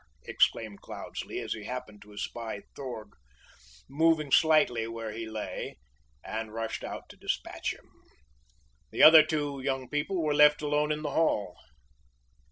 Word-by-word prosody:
exclaimed 110 Hz, -3 st, +1 dB
Cloudesley, -, -, -7 dB
as -, -, -3 dB
he 105 Hz, -2 st, -8 dB
happened 110 Hz, -4 st, -7 dB
to 105 Hz, -, -15 dB
espy 110 Hz, +1 st, -5 dB
Throg 120 Hz, -6 st, -7 dB, 0.7 s
moving 155 Hz, 0 st, +2 dB
slightly 150 Hz, -9 st, +4 dB
where 115 Hz, -1 st, -5 dB
he 110 Hz, +1 st, -6 dB
lay, 110 Hz, -1 st, -5 dB, 0.5 s
and 110 Hz, 0 st, -5 dB
rushed 115 Hz, 0 st, -4 dB
out -, -, -7 dB
to -, -, -12 dB
dispatch -, -, -3 dB
him. -, -, -13 dB, 1.0 s
The -, -, +1 dB
other 155 Hz, 0 st, +11 dB
two 145 Hz, -3 st, -2 dB
young 135 Hz, -2 st, -2 dB
people 160 Hz, +5 st, -1 dB
were 150 Hz, -1 st, +1 dB
left 150 Hz, +1 st, +5 dB
alone 150 Hz, +1 st, +1 dB
in 150 Hz, 0 st, -2 dB
the 145 Hz, -, -2 dB
hall. 105 Hz, -, +1 dB
135 Hz, 145 wpm, -29 LUFS, 110-150 Hz, 1.0 s, other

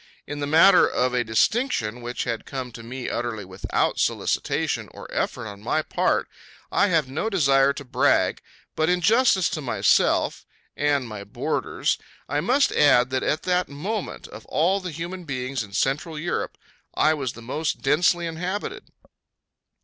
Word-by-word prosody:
In 145 Hz, -, -6 dB
the 145 Hz, -, -2 dB
matter 170 Hz, +5 st, +6 dB
of 125 Hz, 0 st, 0 dB
a 125 Hz, -1 st, +2 dB
distinction 120 Hz, -, 0 dB
which 120 Hz, +1 st, -3 dB
had 115 Hz, -2 st, -4 dB
come 130 Hz, -3 st, -5 dB
to 115 Hz, -, -10 dB
me 120 Hz, +2 st, -6 dB
utterly 115 Hz, -4 st, -3 dB
without 95 Hz, +1 st, -1 dB
solicitation -, -, 0 dB
or -, -, -9 dB
effort -, -, -2 dB
on 100 Hz, -1 st, -9 dB
my 155 Hz, +8 st, 0 dB
part -, -, 0 dB, 0.4 s
I 205 Hz, -, +3 dB
have 165 Hz, -7 st, +2 dB
no 150 Hz, +12 st, -2 dB
desire 140 Hz, -8 st, +4 dB
to 140 Hz, -, -8 dB
brag, 125 Hz, -, +2 dB, 0.3 s
but 155 Hz, +1 st, +1 dB
in 180 Hz, 0 st, +2 dB
justice 215 Hz, -2 st, +4 dB
to 155 Hz, -, -4 dB
myself 130 Hz, -4 st, +2 dB, 0.3 s
and 145 Hz, -3 st, +1 dB
my 105 Hz, -2 st, -7 dB
boarders -, -, -2 dB, 0.3 s
I 145 Hz, +2 st, 0 dB
must 265 Hz, -, +3 dB
add 125 Hz, -4 st, +4 dB
that 130 Hz, -, 0 dB
at 155 Hz, -, -1 dB
that 180 Hz, -1 st, +1 dB
moment, 185 Hz, +9 st, -4 dB
of -, -, -10 dB
all 185 Hz, +5 st, +2 dB
the 185 Hz, -1 st, -5 dB
human 170 Hz, +4 st, -6 dB
beings 130 Hz, -3 st, -3 dB
in 105 Hz, -3 st, -8 dB
Central 150 Hz, -, -1 dB
Europe, 170 Hz, +3 st, -3 dB, 0.4 s
I 155 Hz, -, +4 dB
was 135 Hz, -5 st, -3 dB
the 115 Hz, -, -12 dB
most 150 Hz, +6 st, -3 dB
densely 170 Hz, +5 st, +3 dB
inhabited. 185 Hz, -, -4 dB
145 Hz, 165 wpm, -24 LUFS, 125-175 Hz, 0.4 s, matter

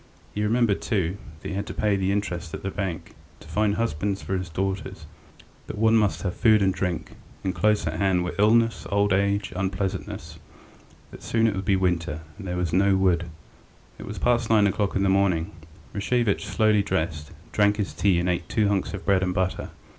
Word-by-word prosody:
He 105 Hz, -, -2 dB
remembered, 110 Hz, -1 st, +2 dB
too, 95 Hz, -4 st, -1 dB, 0.2 s
that -, -, -6 dB
he -, -, -4 dB
had 100 Hz, +2 st, -3 dB
to -, -, -6 dB
pay 105 Hz, -2 st, +2 dB
the 95 Hz, 0 st, 0 dB
interest 90 Hz, -5 st, -2 dB
at -, -, -9 dB
the 95 Hz, -, -2 dB
bank, 95 Hz, -4 st, -4 dB, 0.3 s
to -, -, -15 dB
find 105 Hz, -1 st, +1 dB
husbands 100 Hz, -2 st, -1 dB
for 95 Hz, -, -3 dB
his 90 Hz, -1 st, -3 dB
daughters, 95 Hz, -1 st, -3 dB, 0.6 s
that -, -, -6 dB
one 110 Hz, +1 st, +4 dB
must 105 Hz, -3 st, +2 dB
have 90 Hz, -2 st, -1 dB
food 110 Hz, -4 st, +4 dB
and 95 Hz, -1 st, +2 dB
drink, 90 Hz, -3 st, -3 dB, 0.3 s
and 95 Hz, -, -1 dB
close 105 Hz, 0 st, +2 dB
at 80 Hz, -, -3 dB
hand 95 Hz, -3 st, +2 dB
were 90 Hz, -, -3 dB
illness, 115 Hz, +2 st, +3 dB
old 100 Hz, -1 st, +2 dB
age, 100 Hz, 0 st, +1 dB
unpleasantnesses, 95 Hz, -4 st, -3 dB, 0.7 s
that -, -, -11 dB
soon 115 Hz, 0 st, +1 dB
it 110 Hz, -, +2 dB
would 95 Hz, 0 st, -4 dB
be 100 Hz, -, +3 dB
winter, 90 Hz, -4 st, 0 dB, 0.2 s
and 100 Hz, -, -7 dB
that 90 Hz, -, -2 dB
there -, -, -2 dB
was 90 Hz, -3 st, -1 dB
no 95 Hz, +1 st, +4 dB
wood.... 90 Hz, -3 st, +2 dB, 0.7 s
It -, -, -8 dB
was -, -, -6 dB
past 120 Hz, -2 st, +1 dB
nine 110 Hz, -2 st, +5 dB
o'clock 100 Hz, 0 st, 0 dB
in 95 Hz, -, +2 dB
the -, -, +3 dB
morning. 95 Hz, -2 st, +2 dB, 0.4 s
Rashevitch 105 Hz, 0 st, 0 dB
slowly 110 Hz, -1 st, +3 dB
dressed, 80 Hz, -6 st, -2 dB, 0.2 s
drank 105 Hz, 0 st, +3 dB
his 105 Hz, -2 st, -2 dB
tea 95 Hz, -4 st, +2 dB
and 85 Hz, -, -1 dB
ate 85 Hz, -1 st, -1 dB
two 105 Hz, -2 st, +2 dB
hunks 100 Hz, 0 st, -1 dB
of 100 Hz, -, -9 dB
bread 100 Hz, -2 st, +3 dB
and 90 Hz, -1 st, -1 dB
butter. 95 Hz, 0 st, -1 dB
95 Hz, 205 wpm, -25 LUFS, 90-105 Hz, 0.7 s, nine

